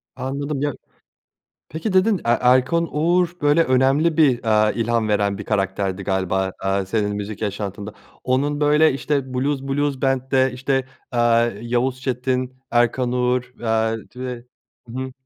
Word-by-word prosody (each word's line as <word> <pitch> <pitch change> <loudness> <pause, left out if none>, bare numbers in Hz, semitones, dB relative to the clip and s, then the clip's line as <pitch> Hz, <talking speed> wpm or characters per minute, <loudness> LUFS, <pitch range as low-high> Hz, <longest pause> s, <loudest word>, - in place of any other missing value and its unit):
Anladım 140 +2 -3
ya. 145 -2 0 1.0
Peki 165 - -4
dedin 190 +1 +3
E - - -13
Erkan 130 +7 +3
Oğur 170 +3 +2
böyle 145 +3 +4
önemli 135 +5 +2
bir, 135 -7 +3
aaa, 110 -1 +3
ilham 115 -1 0
veren 100 -1 +1
bir 105 - -6
karakterdi 95 -1 -1
galiba, 95 -1 -1
aaa, 95 0 0
senin 105 0 -1
müzik 105 +1 -6
yaşantında. 100 0 -4 0.3
Onun 145 +3 0
böyle 150 +1 +4
işte, 135 -1 -2
Blues 135 +1 -1
Blues 140 0 -1
Band'de, 130 0 +1
işte, 135 +1 -1 0.3
aaa, 120 -1 +3
Yavuz 125 +2 -1
Çetin, 130 0 -2
Erkan 120 +1 +1
Oğur. 125 0 0
Aaa 110 -1 0 0.2
ve 125 -1 -6 0.4
hı 115 - -10
hı 130 0 -4
125 Hz, 140 wpm, -21 LUFS, 110-140 Hz, 1.0 s, böyle